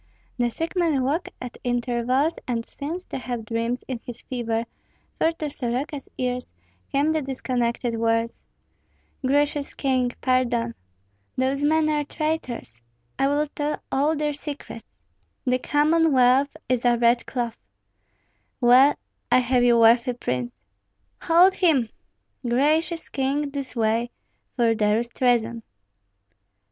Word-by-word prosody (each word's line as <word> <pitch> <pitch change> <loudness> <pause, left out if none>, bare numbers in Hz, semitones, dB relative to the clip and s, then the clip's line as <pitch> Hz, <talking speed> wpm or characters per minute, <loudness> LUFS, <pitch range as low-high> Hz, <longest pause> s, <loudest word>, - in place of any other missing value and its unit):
The 240 -1 +1
sick 330 - -4
man 325 -7 +2
woke 300 +7 -1
at 250 -1 -8
intervals 245 +4 0
and 230 -2 -2
seemed 330 +6 -6
to - - -3
have 240 -2 -5
dreams 230 +2 -2
in 255 -3 -4
his 240 -1 -9
fever, 230 -3 -2 0.6
for 325 - +3
to 315 -2 -4
Soroka's 275 +1 -4
ears 250 0 -2 0.4
came 285 +3 +2
the 315 -1 0
disconnected 250 -3 -2
words, 230 0 0 0.8
"Gracious 285 +2 +1
king, 255 -3 +1
pardon 240 -2 +1 0.6
Those 265 +2 0
men 310 +1 +3
are 300 -1 +1
traitors 285 - -4 0.4
I 270 - +3
will 290 +2 +1
tell 295 0 -3
all 290 +4 +2
their 300 0 -1
secrets 290 0 -8 0.6
The 255 0 +2
Commonwealth 290 -2 +3
is 250 -2 0
a 240 -1 +4
red 235 0 +3
cloth 235 -3 -3 1.0
Well, 255 +3 +6 0.4
I - - +7
have 250 0 +2
you, 240 -1 +5
worthy 235 +2 +5
prince 125 - -3 0.6
Hold 350 +3 +5
him! 290 -13 +2 0.5
Gracious 305 +7 +1
king, 280 +2 -1
this 275 -2 -6
way, 230 +1 +1 0.5
for 235 -2 +3
there 210 -1 +2
is 235 +1 -2
treason!" 235 -2 +1
255 Hz, 130 wpm, -24 LUFS, 235-290 Hz, 1.0 s, I